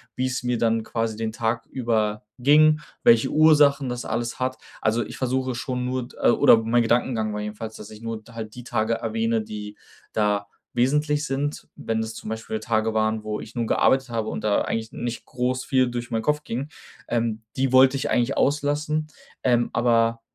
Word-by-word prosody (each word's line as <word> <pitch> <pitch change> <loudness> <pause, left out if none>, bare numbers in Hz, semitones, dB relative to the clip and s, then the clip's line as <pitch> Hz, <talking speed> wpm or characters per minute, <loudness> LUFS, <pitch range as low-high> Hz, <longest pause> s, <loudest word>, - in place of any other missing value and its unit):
wie's 130 0 -1
mir 125 -1 0
dann 115 -1 +1
quasi 115 -2 -2
den 110 -1 -3
Tag 115 +1 -1
über 110 -4 -1 0.2
ging, 150 +3 +5 0.2
welche 115 -1 +5
Ursachen 145 -3 +5
das 125 0 -4
alles 115 +1 -2
hat, 130 0 -1 0.2
also, 110 +2 +1
ich - - -9
versuche 130 -1 -1
schon 125 0 -3
nur 125 -1 -2
äh, - - +5
oder 120 -1 +6
mein 120 +1 +3
Gedankengang 115 -2 +1
war 105 - -3
jedenfalls, 105 +1 -6
dass 105 - -10
ich 110 +1 -12
nur 115 -1 -4
halt 110 -2 -7
die 125 - -8
Tage 110 -1 0
erwähne, 115 0 0
die 105 -1 -7 0.4
da 105 -2 +1 0.3
wesentlich 150 +4 +1
sind, 140 +2 -3
wenn 115 - -3
es 110 0 -3
zum - - -8
Beispiel 110 0 -4
Tage 110 -1 0
waren, 110 0 0
wo 105 0 -3
ich 115 - -10
nur 120 -1 0
gearbeitet 130 +3 +2
habe 115 -2 -2
und 110 - -5
da 105 -1 +2
eigentlich 110 0 -3
nicht 120 -1 -5
groß 125 0 -2
viel 130 -2 +2
durch 120 0 -5
meinen 110 -1 0
Kopf 150 +4 0
ging, 130 +6 -4 0.4
ähm, 115 -2 -1 0.2
die 130 -1 +1
wollte 130 +1 +6
ich 135 - -2
eigentlich 125 +2 +1
auslassen. 150 +2 0 0.4
Ähm, 120 -2 +2
aber, 115 -1 +2
120 Hz, 190 wpm, -24 LUFS, 110-130 Hz, 0.4 s, oder